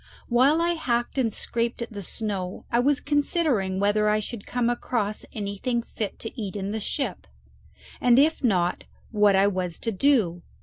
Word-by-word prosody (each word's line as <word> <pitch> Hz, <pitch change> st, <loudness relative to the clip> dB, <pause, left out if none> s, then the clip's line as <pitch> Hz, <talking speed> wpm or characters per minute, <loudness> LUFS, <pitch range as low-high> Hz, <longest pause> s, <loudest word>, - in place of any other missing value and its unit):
While 265 Hz, +7 st, +4 dB
I 345 Hz, -, +2 dB
hacked 240 Hz, -5 st, -1 dB
and 230 Hz, -4 st, +2 dB
scraped 235 Hz, +2 st, -2 dB
at 235 Hz, -1 st, -5 dB
the 205 Hz, -, -5 dB
snow 195 Hz, -2 st, -4 dB
I 235 Hz, -, +3 dB
was 280 Hz, +3 st, +3 dB
considering 285 Hz, -, +1 dB
whether 210 Hz, +1 st, +2 dB
I 210 Hz, 0 st, +3 dB
should 215 Hz, 0 st, -7 dB
come 245 Hz, -1 st, 0 dB
across 235 Hz, -3 st, -1 dB
anything 215 Hz, +4 st, -2 dB
fit 215 Hz, -3 st, -5 dB
to 225 Hz, +1 st, -6 dB
eat 200 Hz, -1 st, -5 dB
in 200 Hz, 0 st, -3 dB
the 220 Hz, -, -2 dB
ship, 270 Hz, +6 st, -3 dB, 0.7 s
and 245 Hz, -1 st, +5 dB
if 305 Hz, +2 st, +3 dB
not 180 Hz, -7 st, +1 dB, 0.3 s
what 210 Hz, -3 st, +4 dB
I 195 Hz, +1 st, +5 dB
was 185 Hz, -4 st, -1 dB
to 230 Hz, -, -2 dB
do. 200 Hz, -7 st, +2 dB
225 Hz, 175 wpm, -25 LUFS, 200-250 Hz, 0.7 s, and